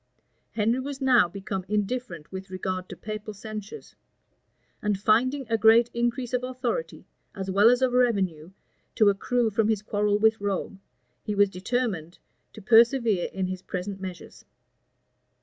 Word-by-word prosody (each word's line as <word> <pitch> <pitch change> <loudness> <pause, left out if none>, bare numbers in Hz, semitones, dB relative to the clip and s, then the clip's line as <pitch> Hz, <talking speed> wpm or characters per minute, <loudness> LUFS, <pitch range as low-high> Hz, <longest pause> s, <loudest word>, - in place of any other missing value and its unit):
Henry 230 +3 +1
was 275 +1 -5
now 255 -8 +4
become 195 0 -5
indifferent 210 -6 -3
with 190 0 -7
regard 185 0 -4
to - - -8
papal 215 0 -6
censures; 215 0 -9 0.9
and 210 -2 -1
finding 255 +7 +2
a 225 0 0
great 225 +2 +5
increase 240 +1 -2
of 250 0 0
authority, 255 - -4 0.3
as 190 -1 -4
well 205 +4 +6
as 250 +1 +3
of 255 -1 +2
revenue, 195 -10 +1 0.5
to 215 -2 +5
accrue 225 +3 0
from 215 +1 +1
his 215 -2 0
quarrel 205 0 +1
with 220 0 +2
Rome, 200 -1 -3 0.4
he 210 - -3
was 200 -1 +3
determined 185 -4 -3 0.4
to 215 - -12
persevere 230 -3 +4
in 190 -1 -2
his 185 0 -5
present 190 +1 -5
measures. 185 -3 -9
210 Hz, 150 wpm, -26 LUFS, 195-240 Hz, 0.9 s, well